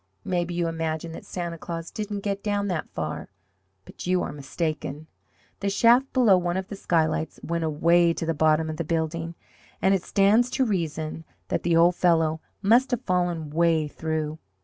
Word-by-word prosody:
Maybe 175 -1 -1
you 170 -1 0
imagine 165 0 -3
that - - -10
Santa 170 -2 -4
Claus 165 0 -6
didn't 210 -2 -4
get 200 0 -2
down 205 -1 -1
that 175 -4 -2
far. 80 -1 -5 0.6
But - - -9
you 180 0 +2
are - - -4
mistaken. 150 +1 -4 0.5
The 200 - -1
shaft 240 +6 +4
below 230 -8 +5
one 175 0 -1
of 190 +1 -4
the 205 - -5
skylights 160 -4 0
went 170 0 -2
away 170 +2 +3
to 165 - -4
the 165 - 0
bottom 155 +1 +2
of 155 0 -4
the 170 - -1
building, 165 +1 -2 0.4
and 190 - +3
it 190 - +1
stands 205 +7 +3
to 265 - +3
reason 160 -6 -2 0.3
that - - 0
the 170 -1 +1
old 170 +2 +5
fellow 160 -3 +2 0.2
must 235 +6 +4
have 245 -3 -1
fallen 175 -4 -1
way 165 -1 +2
through. 155 0 -3
170 Hz, 180 wpm, -25 LUFS, 160-190 Hz, 0.6 s, below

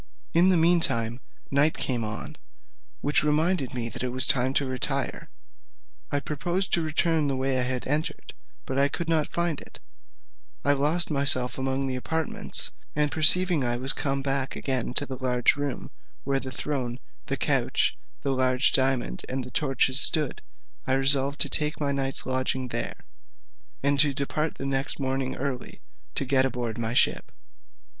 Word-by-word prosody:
In 175 +3 +4
the 185 - +3
mean 170 +2 +4
time 115 -5 +1 0.3
night 145 +3 +3
came 120 -3 -2
on, 110 +1 -6 0.7
which 145 +1 +1
reminded 150 -2 0
me 120 -2 -3
that - - -7
it 125 - -2
was 130 +1 +5
time 130 -2 +2
to 140 - +1
retire. 130 +1 -3 0.8
I 145 - 0
proposed 175 +6 -3
to 170 - +2
return 160 0 0
the 135 - -1
way 130 0 -1
I - - +2
had 125 0 -2
entered, 150 +3 -3 0.3
but 135 +1 -3
I 140 - +4
could 170 +3 -5
not 160 -2 +1
find 170 -3 -2
it; - - -13 0.9
I 145 - +4
lost 150 +5 0
myself 135 -3 +3
among 135 +1 -2
the 130 -1 -3
apartments; 160 +4 -2 0.2
and 150 -1 +1
perceiving 165 0 +7
I 120 -1 -1
was 130 +2 +3
come 135 -1 -2
back 135 -1 -2
again 130 -2 -2
to 145 - +1
the 130 -2 -7
large 125 0 +2
room, 145 -2 -4 0.3
where 135 0 -1
the 135 - -7
throne, 130 -2 -3 0.3
the - - -2
couch, - - +1 0.3
the 140 - -1
large 130 0 +2
diamond, 130 -1 0
and 130 0 -3
the 125 - -10
torches 135 0 +4
stood, 150 -4 +5 0.5
I 130 - +1
resolved 135 +1 +4
to - - +3
take 150 0 0
my 145 -2 -1
night's 135 -1 -1
lodging 130 0 -1
there, - - -5 0.8
and 140 0 +1
to 145 -2 +3
depart 150 +2 -3
the 135 - -7
next 135 +1 -3
morning 135 -1 -2
early, 135 -2 -5 0.4
to 140 - +1
get 130 0 +2
aboard 120 -3 -4
my 115 +1 -3
ship. - - +1
135 Hz, 170 wpm, -25 LUFS, 130-150 Hz, 0.9 s, perceiving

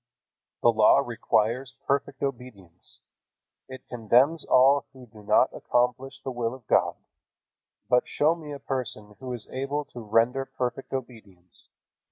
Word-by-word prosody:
The 120 - +7
Law 110 +5 +5
requires 120 +2 0
perfect 140 0 -1
obedience. 115 -10 -6 0.7
It 130 0 -10
condemns 125 +7 +3
all 135 +2 +4
who 130 -2 -13
do 110 -2 -15
not 100 - +3
accomplish 125 +2 -1
the 135 - -3
will 120 0 -2
of 130 -4 -16
God. - - +2 0.9
But 125 +2 +3
show 155 +2 +2
me 160 -3 -9
a 145 - -5
person 120 -6 -5
who 130 -1 -6
is 120 -3 -5
able 140 +3 -2
to 120 - -7
render 115 +5 +2
perfect 125 +1 -4
obedience. 105 -9 -7
125 Hz, 140 wpm, -27 LUFS, 115-135 Hz, 0.9 s, The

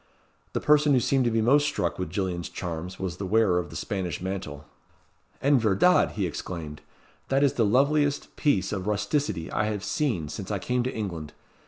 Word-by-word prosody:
The - - 0
person 150 -1 +4
who 130 - +5
seemed 130 +1 +2
to - - +3
be 115 -1 +1
most 145 +5 +4
struck 90 - -2
with 90 - -3
Gillian's 90 -1 -2
charms 90 0 -5
was 90 -3 -4
the 100 - -4
wearer 100 -3 +3
of 90 - -5
the - - -11
Spanish 95 -6 -3
mantle. 90 -6 -5 0.8
"En 140 -1 +5
verdad!" 110 - +3
he 100 -4 -1
exclaimed, 80 -3 -6 0.5
"that 135 +1 +2
is 140 - +3
the 115 - +2
loveliest 140 +6 +2
piece 100 -11 +1
of 100 -2 -3
rusticity 105 - -1
I 105 - 0
have 105 -2 -3
seen 105 - -1
since 95 +5 -6
I 105 - -1
came 125 +6 -1
to 130 - -1
England. 85 - -5
105 Hz, 190 wpm, -26 LUFS, 90-130 Hz, 0.8 s, who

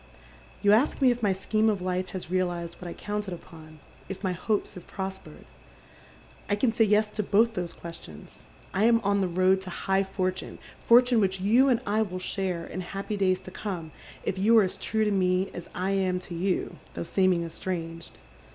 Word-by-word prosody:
" - - -24
You 205 - +5
ask 240 +8 +3
me 260 -3 +5
if 240 0 -3
my 205 -3 +3
scheme 215 +3 +1
of 205 -3 0
life 185 0 -2
has 185 -2 -7
realized 175 -2 -1
what 180 - -7
I 170 - -5
counted 205 -3 -4
upon, 155 -2 -14 0.3
if 195 +1 -6
my 190 - +1
hopes 200 +4 -1
have 180 - -11
prospered. 190 0 -7 1.0
I 205 - +3
can 225 +2 +1
say 225 -1 +4
yes 210 +1 +3
to 210 - -1
both 220 +3 +3
those 175 -4 -3
questions. 165 - -11 0.3
I 200 +3 +2
am 230 0 +5
on 200 -1 +1
the 190 - +1
road 185 +2 +3
to 190 - -7
high 195 +2 0
fortune, 185 -1 -3 0.2
fortune 245 -1 +5
which 190 -1 +1
you 235 +8 +4
and 245 -2 +2
I 215 +2 +1
will 185 -4 -2
share 185 -2 -2
in 185 - -5
happy 195 +3 -4
days 185 -2 +1
to 185 - -10
come 175 -7 -5 0.3
if 190 - -2
you 225 +4 +5
are 220 - +7
as 185 - -2
true 220 0 0
to 210 - +1
me 185 -1 +1
as 175 - -8
I 185 +2 -1
am 190 -2 +1
to 175 - -8
you, 180 +2 -1 0.2
though 85 - -3
seeming 185 - +2
estranged. 165 -1 -5
190 Hz, 205 wpm, -27 LUFS, 180-210 Hz, 1.0 s, are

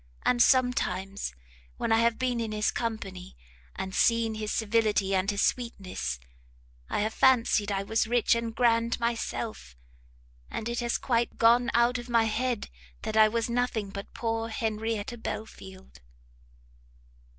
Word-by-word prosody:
and 240 -1 +3
sometimes 200 - +2 0.5
when - - -1
I 225 - +5
have 230 0 +2
been 250 -2 -1
in 225 -2 -2
his 215 0 0
company, 195 -6 -5 0.4
and 190 - -5
seen 230 0 +3
his 215 -1 -4
civility 215 -3 +1
and 190 +1 +1
his 205 -1 +1
sweetness, 190 - -2 0.7
I - - 0
have 215 +1 -1
fancied 230 -5 +3
I 195 0 -1
was 220 +2 0
rich 240 0 +3
and 230 -1 -2
grand 230 -1 +2
myself, 230 - -3 0.7
and 220 - -4
it 235 0 -2
has 235 -1 0
quite 235 -2 0
gone 235 +1 +5
out 240 +1 +3
of 240 +1 -9
my 230 -1 +4
head 230 +1 -1 0.3
that 215 - -3
I 220 0 +7
was 230 +1 -1
nothing 235 -4 -1
but 200 0 -7
poor 225 -1 -2
Henrietta 220 0 -3
Belfield!" 190 - -8
225 Hz, 145 wpm, -28 LUFS, 210-235 Hz, 0.7 s, I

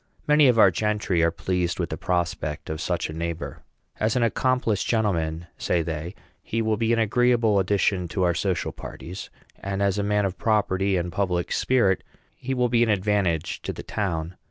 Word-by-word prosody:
Many 150 -1 +6
of 125 -2 +4
our 100 -4 +7
gentry 100 -2 0
are 85 - +4
pleased 90 +1 -2
with 85 -2 -2
the - - -1
prospect 85 -4 -2
of 80 +1 -4
such 90 -1 -1
a 80 - -7
neighbor. 85 +1 -4 0.4
"As 110 +1 +1
an 125 - +2
accomplished 115 -2 +1
gentleman," 85 -7 0
say 85 -2 +1
they, 80 +3 -5 0.3
"he 115 - -3
will 110 -1 +1
be 115 +1 0
an 115 - +3
agreeable 115 -1 +3
addition 95 -1 +1
to 85 +2 -1
our 90 -1 +3
social 90 0 -1
parties; 90 +4 -8 0.3
and 95 0 -3
as 100 0 +1
a - - 0
man 105 0 +1
of 95 -1 -4
property 100 -3 +1
and 85 0 -2
public 90 -1 -1
spirit, 115 -8 +2 0.3
he 130 +1 -3
will 125 -1 +2
be 120 0 +2
an 120 - +3
advantage 100 -5 0
to - - -3
the - - -8
town." 90 -4 -3
95 Hz, 190 wpm, -25 LUFS, 85-110 Hz, 0.4 s, our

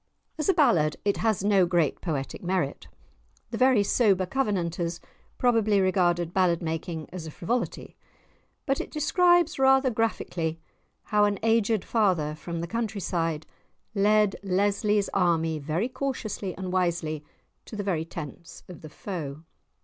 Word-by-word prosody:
As 305 - 0
a - - +6
ballad 175 - +3
it 200 - +2
has 220 -4 0
no 200 -3 +4
great 170 -5 +1
poetic 145 -6 -3
merit; 185 +1 -2 0.6
the - - -3
very 255 -5 +5
sober 200 -3 +3
Covenanters 175 -7 -1 0.4
probably 225 -4 +3
regarded 175 -3 +1
ballad 180 -3 +2
making 160 -1 -4
as 170 -3 -6
a - - -5
frivolity. 230 +11 -3 0.7
But 275 -2 0
it - - -7
describes 350 +1 +3
rather 265 0 +4
graphically 180 -8 -2 0.4
how 210 -1 +3
an 205 -1 0
"aged 225 -2 +2
father," 185 -9 +1
from 165 +2 -5
the - - -2
country 220 0 -3
side, 165 -4 -2 0.5
led 210 0 +3
Lesly's 200 +2 +1
army 165 -4 +1
very 160 +9 -1
cautiously 235 -8 -4
and 185 -1 -4
wisely 170 -4 0 0.4
to - - -9
the 205 - -3
very 175 -5 -1
tents 165 +1 -9
of 180 - -11
the 155 - -9
foe. 155 -4 -6
190 Hz, 140 wpm, -27 LUFS, 170-220 Hz, 0.7 s, a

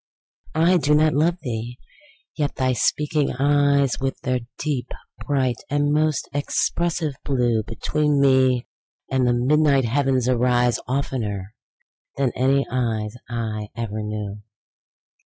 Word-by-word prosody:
I 170 +3 +4
do 150 -2 +2
not 155 +1 +3
love 165 +4 +2
thee!—yet 125 - -6
thy 130 -1 +1
speaking 150 +4 0
eyes, 140 0 +2
With 135 0 -2
their 130 -1 0 0.2
deep, 135 -5 -2 0.4
bright, 130 -4 +1
and 145 0 +1
most 155 -1 +1
expressive 160 +2 -1
blue, 120 -5 +1
Between 150 +6 0
me 130 -3 +3 0.5
and 130 -1 +2
the 120 - +3
midnight 140 +2 +3
heaven 135 +2 +1
arise, 125 -1 +2
15 130 - -1
Oftener 105 -7 -3 0.6
than 135 -3 +1
any 135 +2 +2
eyes 110 -4 -1 0.2
I 110 -3 -3
ever 110 -2 -4
knew. 105 -1 -5
130 Hz, 120 wpm, -22 LUFS, 120-145 Hz, 0.6 s, I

